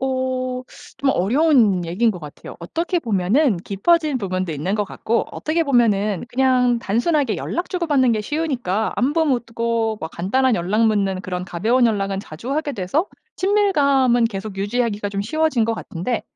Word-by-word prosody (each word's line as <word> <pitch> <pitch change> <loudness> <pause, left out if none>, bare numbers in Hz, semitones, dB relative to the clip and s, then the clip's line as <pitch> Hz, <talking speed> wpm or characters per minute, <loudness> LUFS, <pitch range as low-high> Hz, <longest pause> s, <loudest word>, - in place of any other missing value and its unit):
어 255 -1 -2 0.3
좀 275 - +1
어려운 225 - +3
얘기인 200 +8 +1
것 180 - -8
같아요. 150 -1 -10
어떻게 335 - -2
보면은 220 - +2
깊어진 300 - +1
부분도 185 -4 -2
있는 155 +8 -2
것 210 - 0
같고 230 +3 -2
어떻게 325 +2 -1
보면은 215 - +2
그냥 250 -2 +2
단순하게 240 - 0
연락 350 - -3
주고받는 295 -9 +2
게 215 - 0
쉬우니까 245 - -1
안부 295 +6 +2
묻고 230 -3 -1
뭐 160 - -4
간단한 240 +10 +1
연락 210 +6 +1
묻는 195 -3 +1
그런 180 -1 -4
가벼운 225 +8 +2
연락은 195 -3 -1
자주 210 - -7
하게 300 -1 -1
돼서 270 - -1 0.3
친밀감은 280 - +3
계속 200 -2 -6
유지하기가 205 0 -1
좀 200 0 -3
쉬워진 300 0 +1
것 230 0 0
같은데 205 +5 -4
235 Hz, 355 characters per minute, -21 LUFS, 195-275 Hz, 0.3 s, 어려운